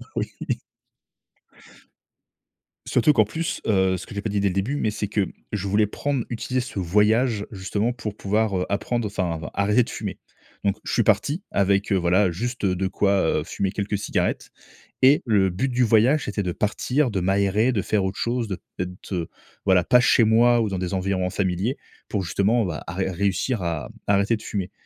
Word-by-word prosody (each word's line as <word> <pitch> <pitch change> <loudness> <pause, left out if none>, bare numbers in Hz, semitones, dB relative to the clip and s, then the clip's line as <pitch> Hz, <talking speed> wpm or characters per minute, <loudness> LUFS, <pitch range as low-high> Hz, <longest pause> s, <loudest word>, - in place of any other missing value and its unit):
Oui. - - 0 2.6
Surtout 150 +5 +3
qu'en 110 -5 +5
plus, 160 +10 -3
heu, 95 -3 +2
ce - - -8
que - - -11
j'ai 100 - -3
pas 110 - -3
dit, 100 0 0
dès 100 - +2
le 90 - -3
début, 100 +9 -1
mais 110 -7 0
c'est 105 -1 -3
que 100 -1 0 0.3
je 100 -1 -2
voulais 105 +1 +3
prendre 140 +2 -2
utiliser 125 +2 -2
ce 120 -5 -4
voyage, 105 +4 +2
justement, 105 +4 -1
pour 105 -4 -6
pouvoir, 105 -1 0
heu, 90 - -1
apprendre, 115 +3 -1
enfin, 90 -5 -2
arrêter 105 +5 +3
de - - -9
fumer. - - -5 0.5
Donc 100 +1 +1
je - - -3
suis 120 - +3
parti 140 - +1
avec, 100 +1 +1
heu, - - +4
voilà, 90 +2 +3
juste 120 +5 -3
de 95 0 0
quoi, 95 -5 +1
heu, - - -3
fumer 95 +2 -2
quelques 100 0 -2
cigarettes 100 - -1 0.5
et 135 +3 +6
le 100 -4 +3
but 95 +9 -1
du 125 0 +1
voyage, 115 +6 +4
c'était 105 0 -2
de 90 - -2
partir, 125 - 0
de 95 - -1
m'aérer, 100 +5 +2
de 100 - +1
faire 105 0 0
autre 95 - -3
chose, 120 -1 -1
de 95 - -3 0.2
d'être, 90 +2 -5
heu, 85 -3 -2 0.4
voilà, 95 -3 +4
pas 125 - +6
chez 125 -2 +5
moi 120 +2 +5
ou 110 - +1
dans 95 -2 -3
des 90 0 -3
environs 95 -1 0
familiers, 95 +7 -1 0.3
pour 100 -3 -1
justement, 100 +6 +1
bah, 80 -4 -4
à - - -5
ré 95 0 -1
réussir 100 +4 0
à, 80 -3 -3
mmh, - - -11 0.2
arrêter 100 +3 +3
de - - -15
fumer 95 -3 -4
100 Hz, 200 wpm, -24 LUFS, 95-115 Hz, 2.6 s, et